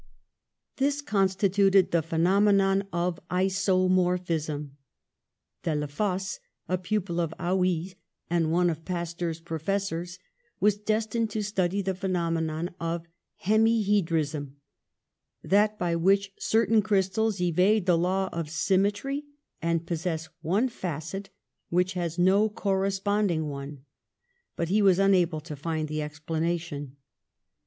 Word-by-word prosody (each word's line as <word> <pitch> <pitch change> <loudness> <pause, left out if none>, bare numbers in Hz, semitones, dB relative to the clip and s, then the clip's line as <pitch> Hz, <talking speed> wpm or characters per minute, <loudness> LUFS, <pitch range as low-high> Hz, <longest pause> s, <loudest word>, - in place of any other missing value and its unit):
This 280 +1 +1
constituted 195 -5 +3
the 170 - +3
phe 165 +2 -10
nomenon 195 +2 +3
of 175 0 -1
isomorphism. 180 -5 +1 0.9
Delafosse, 180 +5 -2 0.3
a 185 0 0
pupil 185 -2 -2
of 165 -2 -1
Haiiy's, 180 0 0 0.3
and 165 -2 +1
one 175 +1 +3
of 160 0 -7
Pasteur's 170 -2 -3
professors, 175 +2 -3 0.4
was 210 0 +4
destined 220 +1 0
to 215 0 -2
study 195 -1 0
the 190 0 -1
phenomenon 170 -3 -2
of 165 0 -3 0.3
hemi 220 +2 +3
hedrism, 160 -8 0 0.9
that 210 +2 +3
by 175 -3 0
which 195 +3 +2
certain 225 0 +3
crystals 205 0 +1
evade 180 +4 +3
the 180 - +4
law 185 +3 +1
of 165 -2 -3
symmetry 205 - 0 0.4
and 165 0 0
possess 165 -2 -3
one 195 +10 +1
facet 185 - -5 0.4
which 180 +2 +1
has 170 -2 -3
no 195 +4 +4
corresponding 195 -4 0
one, 140 0 -7 0.7
but 170 -1 -2
he 210 +3 +3
was 190 -3 +5
unable 180 -5 +3
to 150 -1 -7
find 155 +1 -3
the 155 0 -3
explanation. 150 -1 -3
180 Hz, 115 wpm, -27 LUFS, 165-200 Hz, 0.9 s, was